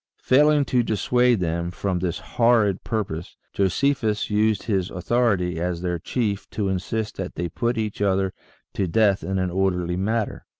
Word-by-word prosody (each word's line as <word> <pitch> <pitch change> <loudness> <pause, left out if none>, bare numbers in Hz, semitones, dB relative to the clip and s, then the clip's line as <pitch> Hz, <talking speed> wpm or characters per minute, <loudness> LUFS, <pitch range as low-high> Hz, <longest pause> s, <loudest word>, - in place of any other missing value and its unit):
Failing 145 +2 +4
to 125 -2 +2
dissuade 120 +1 +2
them 85 0 -1
from 90 +1 -2
this 90 -1 -2
horrid 115 -5 +2
purpose, 95 -8 -4 0.2
Josephus 110 +2 0
used 105 -1 +2
his 95 -5 0
authority 95 -3 0
as 90 0 -2
their 90 -1 -1
chief 105 +1 -2
to 100 -3 -2
insist 105 +3 -3
that 95 -1 -5
they 85 - -2
put 120 +7 -1
each 105 -2 -3
other 95 -1 +1 0.4
to 95 - -1
death 100 +2 +2
in 95 0 -2
an 95 -1 -1
orderly 90 -2 0
manner. 110 +3 -2
100 Hz, 160 wpm, -23 LUFS, 90-110 Hz, 0.4 s, Failing